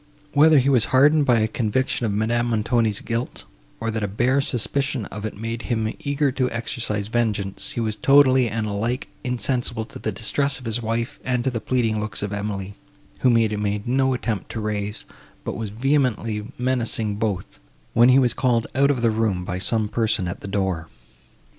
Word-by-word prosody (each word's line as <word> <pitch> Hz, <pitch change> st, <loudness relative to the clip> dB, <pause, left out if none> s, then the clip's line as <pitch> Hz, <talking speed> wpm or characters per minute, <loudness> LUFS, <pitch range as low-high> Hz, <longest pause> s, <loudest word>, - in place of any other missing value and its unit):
Whether 155 Hz, +2 st, +6 dB
his 135 Hz, +1 st, +4 dB
was 125 Hz, -5 st, +4 dB
hardened 145 Hz, +3 st, +4 dB
by 120 Hz, -3 st, +4 dB
a 110 Hz, -, +2 dB
conviction 120 Hz, +2 st, 0 dB
of -, -, -1 dB
Madame 115 Hz, +3 st, 0 dB
Montoni's 110 Hz, -1 st, +1 dB
guilt, 115 Hz, +2 st, -3 dB, 0.4 s
or 115 Hz, 0 st, -2 dB
that 110 Hz, 0 st, -2 dB
a 105 Hz, -, 0 dB
bare 125 Hz, +7 st, +2 dB
suspicion 135 Hz, 0 st, -1 dB
of 105 Hz, +1 st, -5 dB
it 110 Hz, -, -5 dB
made 115 Hz, +2 st, -4 dB
him 110 Hz, -2 st, 0 dB
eager 140 Hz, 0 st, 0 dB
to 130 Hz, -1 st, 0 dB
exercise 115 Hz, -3 st, -2 dB
vengeance, 105 Hz, -4 st, -1 dB
he -, -, -3 dB
was 110 Hz, -2 st, -1 dB
totally 130 Hz, -3 st, +5 dB
and 110 Hz, 0 st, -2 dB
alike 110 Hz, +5 st, -2 dB
insensible 125 Hz, -2 st, -1 dB
to -, -, -11 dB
the 110 Hz, -, -2 dB
distress 135 Hz, +7 st, 0 dB
of 130 Hz, -, -11 dB
his 115 Hz, +1 st, -2 dB
wife, 115 Hz, +4 st, -2 dB
and 125 Hz, -1 st, 0 dB
to 130 Hz, -, 0 dB
the 115 Hz, -2 st, -3 dB
pleading 115 Hz, -4 st, 0 dB
looks 105 Hz, -1 st, -3 dB
of 105 Hz, 0 st, -3 dB
Emily, 100 Hz, -1 st, -4 dB, 0.5 s
whom 125 Hz, -2 st, +4 dB
he 115 Hz, -1 st, +4 dB
made 105 Hz, 0 st, -2 dB
no 130 Hz, +1 st, +2 dB
attempt 115 Hz, -5 st, -3 dB
to -, -, -4 dB
raise, 105 Hz, -1 st, -3 dB, 0.4 s
but -, -, -4 dB
was 110 Hz, -2 st, -4 dB
vehemently 115 Hz, -2 st, 0 dB
menacing 115 Hz, -4 st, 0 dB
both, 105 Hz, -4 st, -3 dB, 0.3 s
when 120 Hz, +2 st, +6 dB
he 130 Hz, -, +6 dB
was 125 Hz, -3 st, +3 dB
called 120 Hz, -3 st, +1 dB
out 140 Hz, +2 st, +3 dB
of 130 Hz, -4 st, 0 dB
the 115 Hz, -, +4 dB
room 110 Hz, -5 st, 0 dB
by 90 Hz, +1 st, -3 dB
some 110 Hz, +2 st, 0 dB
person 110 Hz, -4 st, 0 dB
at 85 Hz, -, -5 dB
the -, -, -7 dB
door. 95 Hz, -5 st, -1 dB
115 Hz, 190 wpm, -23 LUFS, 105-125 Hz, 0.5 s, Whether